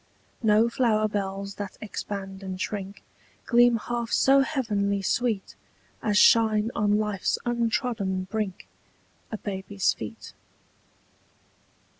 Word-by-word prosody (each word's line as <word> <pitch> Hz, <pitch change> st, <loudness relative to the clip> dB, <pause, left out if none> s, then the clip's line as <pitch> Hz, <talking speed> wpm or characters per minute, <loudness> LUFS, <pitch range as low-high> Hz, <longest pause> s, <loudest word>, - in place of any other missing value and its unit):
No 220 Hz, 0 st, +4 dB
flower 225 Hz, -3 st, +2 dB
bells 200 Hz, -1 st, -3 dB
that 200 Hz, -2 st, -6 dB
expand 195 Hz, -2 st, -6 dB
and 190 Hz, -1 st, -6 dB
shrink 200 Hz, 0 st, -5 dB, 0.4 s
Gleam 240 Hz, -1 st, +5 dB
half 235 Hz, +1 st, -4 dB
so 275 Hz, +1 st, +5 dB
heavenly 205 Hz, -8 st, 0 dB
sweet 225 Hz, -1 st, -1 dB, 0.5 s
As 210 Hz, -1 st, +1 dB
shine 220 Hz, 0 st, +5 dB
on 210 Hz, -1 st, +2 dB
life's 210 Hz, -2 st, 0 dB
untrodden 230 Hz, -5 st, -1 dB
brink 200 Hz, -1 st, -4 dB, 0.6 s
A 220 Hz, -, -3 dB
baby's 195 Hz, -1 st, -1 dB
feet. 110 Hz, -2 st, -9 dB
210 Hz, 105 wpm, -26 LUFS, 195-230 Hz, 0.6 s, Gleam